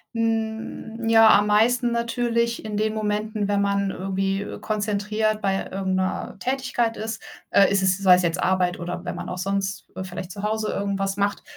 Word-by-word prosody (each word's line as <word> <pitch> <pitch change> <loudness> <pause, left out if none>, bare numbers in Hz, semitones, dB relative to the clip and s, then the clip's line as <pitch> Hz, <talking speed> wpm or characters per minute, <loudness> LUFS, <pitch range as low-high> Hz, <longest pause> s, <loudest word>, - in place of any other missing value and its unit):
Hm, 225 0 -2
ja, 225 -1 +7
am 205 0 +1
meisten 240 +4 +3
natürlich 235 0 0
in 215 -1 -4
den 215 +1 0
Momenten, 215 0 -1
wenn 200 0 +2
man 200 -1 +1
irgendwie, 195 +1 -2
äh, 205 - -6
konzentriert 215 0 -1
bei 195 -1 0
irgend 190 -1 -2
’ner 185 +1 -3
Tätigkeit 250 -2 -1
ist. 220 +1 -5 0.3
Äh, 195 - +5
ist 195 -1 +2
es 185 -1 +3
sei 190 -2 +6
es 180 - +1
jetzt 170 0 -1
Arbeit 180 -1 +1
oder 175 0 -5
wenn - - -4
man - - -6
auch 180 - -4
sonst, 195 +1 -2
äh, 190 - -4
vielleicht 185 0 -7
zu 200 +2 -8
Hause 215 0 -1
irgendwas 195 -1 -2
macht 200 0 0
205 Hz, 185 wpm, -24 LUFS, 195-220 Hz, 0.3 s, ja